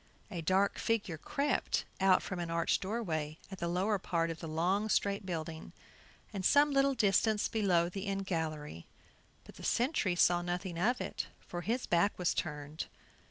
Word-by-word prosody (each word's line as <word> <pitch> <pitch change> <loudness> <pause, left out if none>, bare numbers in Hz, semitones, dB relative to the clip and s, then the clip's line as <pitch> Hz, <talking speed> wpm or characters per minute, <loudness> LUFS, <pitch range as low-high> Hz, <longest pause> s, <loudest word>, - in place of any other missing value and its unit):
A 175 -4 -3
dark 190 +5 +2
figure 210 -8 -1
crept 285 - 0
out 190 -1 +4
from 190 - -4
an 170 -1 -3
arched 165 0 +1
doorway 165 -8 -2
at 190 - -7
the 170 - -1
lower 190 +4 +1
part 165 -2 0
of 165 - -7
the 165 - -6
long 180 +7 +1
straight 200 -2 +1
building, 160 -2 -5 0.6
and 195 -2 -3
some 290 +7 +5
little 275 0 +3
distance 210 -1 +3
below 185 -6 +2
the 195 +3 -5
end 195 0 -2
gallery, 155 - -3 0.6
but - - -14
the - - -11
sentry 235 - +1
saw 175 0 +4
nothing 175 0 -3
of 245 +7 +2
it, - - -3
for 175 - -6
his 235 +7 -1
back 175 +4 +2
was 180 -2 +1
turned. 150 -1 -4
185 Hz, 170 wpm, -33 LUFS, 165-205 Hz, 0.6 s, some